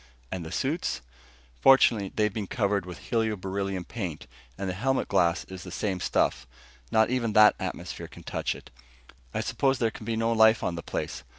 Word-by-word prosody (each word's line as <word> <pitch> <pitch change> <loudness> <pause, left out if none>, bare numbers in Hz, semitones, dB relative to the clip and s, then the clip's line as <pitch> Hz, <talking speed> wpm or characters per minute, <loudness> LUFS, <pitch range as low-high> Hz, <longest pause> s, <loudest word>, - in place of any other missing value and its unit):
"And 90 - -3
the 80 - -8
suits?" 145 - -1 0.6
"Fortunately, 115 - +5
they've 105 -2 +1
been 105 -3 -3
covered 100 -4 0
with 90 -1 -7
helio 110 -2 0
beryllium 95 -1 -3
paint, 90 -7 -5 0.3
and 95 - -3
the 90 - -1
helmet 135 +8 0
glass 85 +1 +2
is 95 -1 -9
the 90 - -8
same 95 +1 -2
stuff. 65 - 0 0.4
Not 110 +2 +4
even 120 -4 0
that 105 0 +7
atmosphere - - -5
can - - -13
touch - - -2
it. - - -13 0.6
I - - -1
suppose 135 -1 +1
there 115 -2 +1
can 110 - -10
be 115 - 0
no 115 +1 +1
life 110 0 +5
on - - 0
the 85 - -5
place. - - -4
105 Hz, 190 wpm, -27 LUFS, 95-115 Hz, 0.6 s, that